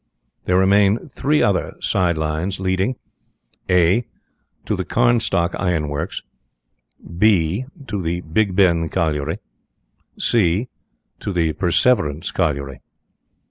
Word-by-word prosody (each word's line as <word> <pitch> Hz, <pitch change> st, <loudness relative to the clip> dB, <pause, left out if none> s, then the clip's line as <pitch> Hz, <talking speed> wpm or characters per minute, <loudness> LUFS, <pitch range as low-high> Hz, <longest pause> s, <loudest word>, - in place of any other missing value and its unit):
There 90 Hz, -, +2 dB
remain 100 Hz, +2 st, +4 dB
three 150 Hz, +3 st, +1 dB
other 95 Hz, -4 st, 0 dB
side 90 Hz, -4 st, 0 dB
lines 80 Hz, +5 st, -2 dB
leading 95 Hz, +6 st, 0 dB, 0.7 s
(a) 90 Hz, +5 st, +3 dB, 0.6 s
To -, -, -1 dB
the -, -, -2 dB
Carnstock 115 Hz, -7 st, +1 dB
Iron 85 Hz, -6 st, 0 dB
Works; 75 Hz, +6 st, -4 dB, 1.0 s
(b) 100 Hz, +1 st, +3 dB, 0.2 s
To 105 Hz, -6 st, -3 dB
the 85 Hz, +1 st, -2 dB
Big 90 Hz, +4 st, 0 dB
Ben 85 Hz, -4 st, +3 dB
Colliery; 80 Hz, -1 st, -1 dB, 0.8 s
(c) 105 Hz, +2 st, +1 dB, 0.5 s
To -, -, -4 dB
the 85 Hz, -4 st, 0 dB
Perseverance 85 Hz, -, +1 dB
Colliery. 70 Hz, -6 st, -2 dB
90 Hz, 105 wpm, -20 LUFS, 80-100 Hz, 1.0 s, remain